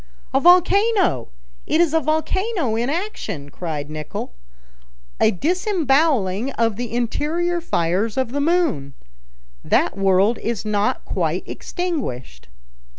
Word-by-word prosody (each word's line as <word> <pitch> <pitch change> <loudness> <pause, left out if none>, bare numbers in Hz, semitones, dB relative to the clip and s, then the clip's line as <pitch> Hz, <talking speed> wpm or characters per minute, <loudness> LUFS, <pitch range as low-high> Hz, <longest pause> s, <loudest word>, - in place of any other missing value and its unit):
"A 270 - +4
volcano! 365 - +4 0.4
it 315 - +2
is 340 -3 +3
a 325 - +4
volcano 315 - 0
in 235 +3 0
action!" 295 - -4
cried 155 -4 -4
Nicholl; 155 - -6 0.9
"a - - +5
disemboweling 285 - +1
of 230 -2 +1
the 240 +2 -5
interior 315 +9 -1
fires 195 - 0
of 260 -3 0
the 285 +2 -1
moon! 290 - 0 0.7
That - - +2
world 195 +4 +3
is 230 -3 -3
not 210 +4 0
quite - - -1
extinguished." 175 - -5
260 Hz, 115 wpm, -21 LUFS, -, 0.9 s, a